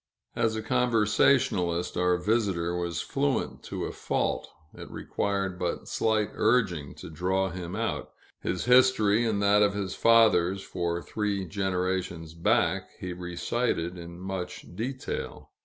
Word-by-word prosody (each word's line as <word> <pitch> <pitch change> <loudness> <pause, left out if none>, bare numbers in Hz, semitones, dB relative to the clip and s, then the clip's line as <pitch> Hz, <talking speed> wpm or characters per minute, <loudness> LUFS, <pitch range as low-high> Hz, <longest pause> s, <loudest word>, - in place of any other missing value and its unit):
As 110 -1 +1
a 110 - -3
conversationist, 105 -6 +2
our 90 0 +2
visitor 90 -4 0
was 85 -1 -2
fluent 70 - -1
to - - -4
a - - -4
fault. - - -2 0.2
It - - -10
required 100 -2 -2
but 90 -1 -2
slight 110 -2 +1
urging 100 - +1
to - - -9
draw 95 +3 0
him 90 +1 -6
out. 115 +1 -2 0.3
His 90 - -2
history, 125 -4 +5
and 105 -2 0
that 100 +1 +5
of 100 -1 +3
his 95 -2 -3
fathers 100 -5 +4
for 85 0 -2
three 105 -3 -2
generations 90 -3 -2
back, 85 0 +1
he 90 -1 -4
recited 90 +1 -2
in 85 0 -9
much 90 -2 -6
detail. 130 +6 -5
95 Hz, 135 wpm, -28 LUFS, 90-110 Hz, 0.3 s, history